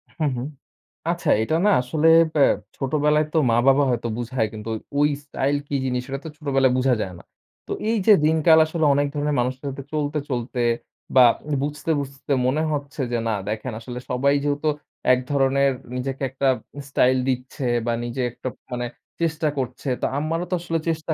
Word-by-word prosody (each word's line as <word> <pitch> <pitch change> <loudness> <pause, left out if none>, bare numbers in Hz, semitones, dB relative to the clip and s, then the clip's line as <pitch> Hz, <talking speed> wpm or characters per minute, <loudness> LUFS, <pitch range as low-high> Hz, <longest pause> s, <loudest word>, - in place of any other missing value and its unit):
হুম, 155 -3 0
হুম। 125 +3 -3 0.6
আচ্ছা 175 0 -2
এটা 110 +8 0
না - - +5
আসলে 150 +6 +1 0.3
ব্যা 145 - +4 0.3
ছোটবেলায় 150 +2 +2
তো - - +2
মা-বাবা 135 +5 +4
হয়তো 120 -1 -1
বুঝায় 120 -1 -1
কিন্তু 110 +1 -7 0.3
ওই 145 +1 +4 0.2
স্টাইল 140 0 0
কি 145 - -2
জিনিস 125 -1 0
সেটা 135 0 -4
তো - - -4
ছোটবেলায় 135 -4 +2
বুঝা 130 0 +3
যায় 95 - -4
না। - - -15 0.4
তো - - -7 0.2
এই 230 - +2
যে 215 - +9
দিনকাল 160 +1 +5
আসলে 160 0 -1
অনেক 145 +1 +2
ধরনের 145 0 -1
মানুষের 130 +2 -2
সাথে 135 0 -7
চলতে, 150 0 -1
চলতে 125 -1 -2 0.5
বা 130 -1 +9 0.4
বুঝতে, 150 +2 -2
বুঝতে 135 +1 -8
মনে 135 +5 +1
হচ্ছে 145 -1 -3
যে 120 - +1
না 110 - +1
দেখেন 110 +4 -3
আসলে 125 +1 -7
সবাই 140 +3 +2
যেহেতু 145 +1 0 0.4
এক 125 - +2
ধরনের 140 0 +3 0.2
নিজেকে 135 +2 -4
একটা 135 +1 -1 0.4
স্টাইল 130 -2 +3
দিচ্ছে 130 +1 -3 0.2
বা 120 - +1
নিজে 120 +2 -3
একটা 125 - -8 0.2
মানে 120 0 -2 0.4
চেষ্টা 160 -1 0
করছে 130 +1 -4
তো - - +1
আমারও 165 +4 -1
তো - - +3
আসলে 165 -1 -1
চেষ্টা 160 0 -1
140 Hz, 175 wpm, -23 LUFS, 125-150 Hz, 0.6 s, যে